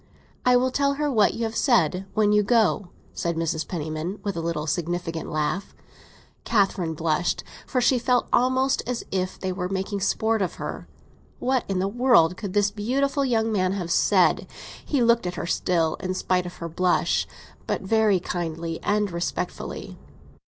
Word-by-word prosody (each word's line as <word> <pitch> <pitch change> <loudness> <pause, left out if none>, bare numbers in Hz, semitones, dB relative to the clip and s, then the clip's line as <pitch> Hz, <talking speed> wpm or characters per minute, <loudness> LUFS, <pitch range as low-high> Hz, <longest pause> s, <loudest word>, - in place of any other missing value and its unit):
"I 250 - +6
will 255 +1 +3
tell 280 +1 +1
her 295 0 0
what 215 -5 +3
you 230 - -3
have 225 0 -2
said—when 205 - +2
you 210 0 +5
go!" 215 -2 +2 0.3
said 170 -1 -2
Mrs. 160 -1 -2
Penniman, 160 +3 -4
with 200 -3 -2
an 165 0 -3
insinuating 165 +1 -2
laugh. 155 +6 -2 0.7
Catherine 195 -7 +1
blushed, 160 +2 0 0.2
for 250 - 0
she 245 +1 +3
felt 245 +1 +2
almost 260 +2 +3
as 245 -1 -2
if 185 -1 -2
they 190 - -2
were 180 -1 -3
making 195 +1 -2
sport 220 +2 +1
of 185 - -1
her. - - -6 0.5
What 260 -1 0
in 195 - 0
the 190 +1 +1
world 205 -7 +4
could 200 -2 -6
this 205 0 +2
beautiful 270 +7 0
young 225 -4 +1
man 185 -3 +1
have 180 -4 -3
said? - - +3 0.4
He 275 -5 +1
looked 235 -4 +3
at 175 - -4
her - - -4
still, 170 -2 0
in 185 0 -3
spite 180 -1 0
of 175 - -9
her 170 - -6
blush; 175 +2 +1 0.4
but - - -1
very 215 -1 +3
kindly 165 -2 -4
and 205 -1 0
respectfully. 170 +1 -4
195 Hz, 165 wpm, -25 LUFS, 170-230 Hz, 0.7 s, I